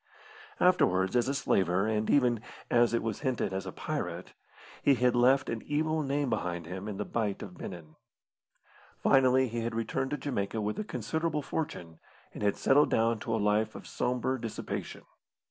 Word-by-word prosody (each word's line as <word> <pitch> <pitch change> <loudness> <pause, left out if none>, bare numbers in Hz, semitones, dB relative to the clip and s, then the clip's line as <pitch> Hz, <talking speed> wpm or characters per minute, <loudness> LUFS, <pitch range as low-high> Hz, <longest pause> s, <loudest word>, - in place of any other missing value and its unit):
Afterwards, 95 - +3
as 120 0 +3
a 140 - 0
slaver, 95 -7 +2
and 110 0 0
even, 125 -5 +3 0.3
as 120 -1 +4
it 115 - 0
was 110 -2 -2
hinted, 130 -8 -1
as 95 0 -3
a - - -4
pirate, - - -4 0.5
he 140 - +4
had 125 0 +2
left 130 +2 +4
an 115 -1 -3
evil 155 +1 0
name 140 0 0
behind 90 -7 -2
him 95 +4 -6
in 105 -2 -4
the 105 - -3
Bight 105 -4 -2
of 90 - -9
Benin. 80 -4 -9 1.0
Finally 130 0 +4
he 115 +1 -3
had 115 0 -3
returned 115 +4 -1
to 145 - -2
Jamaica 110 -7 -2
with 105 0 -2
a - - -1
considerable 155 - -2
fortune, 85 - -4 0.3
and - - -8
had 100 -1 +1
settled 145 +2 +4
down 115 0 +2
to 115 +1 -2
a - - +1
life 105 +1 +1
of - - -9
sombre 125 +1 -1
dissipation. 115 -2 -5
115 Hz, 180 wpm, -30 LUFS, 105-135 Hz, 1.0 s, as